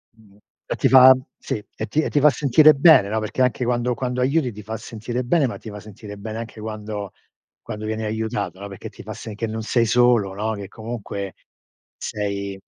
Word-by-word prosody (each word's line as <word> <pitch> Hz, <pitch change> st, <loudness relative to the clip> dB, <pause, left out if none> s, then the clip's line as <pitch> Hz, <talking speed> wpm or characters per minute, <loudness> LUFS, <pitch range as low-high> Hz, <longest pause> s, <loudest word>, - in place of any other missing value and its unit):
Mh-mh. 105 Hz, -3 st, -22 dB, 0.3 s
E -, -, -3 dB
ti -, -, +2 dB
fa, 130 Hz, 0 st, +9 dB, 0.2 s
sì, 105 Hz, -, -4 dB
e 110 Hz, -, -3 dB
ti, 155 Hz, +8 st, 0 dB
ti 145 Hz, -, +2 dB
fa 150 Hz, +2 st, +6 dB
sentire 150 Hz, +2 st, +5 dB
bene, 140 Hz, -, +6 dB
no, 110 Hz, +1 st, 0 dB
perché 110 Hz, +4 st, -3 dB
anche 125 Hz, 0 st, +2 dB
quando 120 Hz, 0 st, 0 dB
quando 125 Hz, +1 st, -2 dB
aiuti 135 Hz, -1 st, +1 dB
ti 105 Hz, 0 st, -10 dB
fa 110 Hz, +2 st, -5 dB
sentire 115 Hz, +2 st, -5 dB
bene, 145 Hz, +3 st, +2 dB
ma 120 Hz, -, -3 dB
ti 110 Hz, -, -10 dB
fa 105 Hz, 0 st, -8 dB
sentire 105 Hz, 0 st, -11 dB
bene 110 Hz, +2 st, -6 dB
anche 115 Hz, -1 st, -8 dB
quando 105 Hz, -2 st, -5 dB, 0.5 s
quando 110 Hz, -1 st, -7 dB
vieni 110 Hz, 0 st, -3 dB
aiutato, 110 Hz, -3 st, -3 dB
no, 100 Hz, -, -6 dB
perché 100 Hz, -2 st, -9 dB
ti -, -, -13 dB
fa -, -, -7 dB
s, 110 Hz, -, -8 dB
che 115 Hz, -, -3 dB
non 110 Hz, +1 st, -4 dB
sei 115 Hz, +1 st, +1 dB
solo, 115 Hz, -4 st, +3 dB
no, 110 Hz, +2 st, -2 dB
che 100 Hz, -2 st, -6 dB
comunque 105 Hz, -3 st, -6 dB, 0.6 s
sei 100 Hz, -2 st, -4 dB
110 Hz, 205 wpm, -22 LUFS, 105-125 Hz, 0.6 s, fa